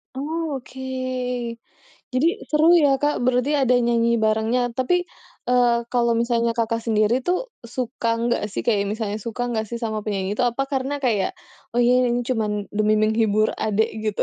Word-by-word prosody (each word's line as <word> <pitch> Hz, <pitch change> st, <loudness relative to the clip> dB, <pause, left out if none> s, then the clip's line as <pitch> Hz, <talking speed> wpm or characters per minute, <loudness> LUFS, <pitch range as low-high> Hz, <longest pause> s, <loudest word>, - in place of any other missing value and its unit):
Oh 295 Hz, -1 st, -3 dB
oke. 265 Hz, -, -13 dB, 1.3 s
Jadi, 255 Hz, +5 st, +2 dB, 0.2 s
seru 305 Hz, +1 st, +3 dB
ya, 280 Hz, -5 st, +3 dB
Kak, 290 Hz, -4 st, 0 dB
berarti 255 Hz, +4 st, +2 dB
ada 265 Hz, -3 st, +2 dB
nyanyi 235 Hz, -1 st, +2 dB
barengnya. 220 Hz, +3 st, +1 dB
Tapi, 355 Hz, +8 st, +1 dB, 0.4 s
eee, 245 Hz, -1 st, +4 dB
kalau 240 Hz, -1 st, +2 dB
misalnya 235 Hz, 0 st, +1 dB
Kakak 230 Hz, 0 st, -1 dB
sendiri 225 Hz, +3 st, +1 dB
tuh 365 Hz, +8 st, -1 dB, 0.2 s
suka 235 Hz, 0 st, -2 dB
enggak 240 Hz, -2 st, 0 dB
sih, -, -, -2 dB
kayak 205 Hz, -4 st, +1 dB
misalnya 215 Hz, -2 st, -3 dB
suka 235 Hz, +3 st, -4 dB
nggak 220 Hz, -2 st, -1 dB
sih 235 Hz, +2 st, -6 dB
sama 220 Hz, -3 st, -3 dB
penyanyi 200 Hz, -1 st, -2 dB
itu? 250 Hz, -, +2 dB
Apa 245 Hz, +3 st, -1 dB
karena 275 Hz, +1 st, -2 dB
kayak, 225 Hz, -8 st, +1 dB, 0.4 s
"Oh 240 Hz, -, +1 dB
iya 250 Hz, +1 st, +4 dB
ini 245 Hz, 0 st, +1 dB
cuman 210 Hz, -4 st, -1 dB
demi 215 Hz, 0 st, +3 dB
menghibur 215 Hz, -1 st, +2 dB
adek," 215 Hz, 0 st, +1 dB, 0.2 s
gitu. 210 Hz, -2 st, 0 dB
235 Hz, 165 wpm, -22 LUFS, 220-255 Hz, 1.3 s, eee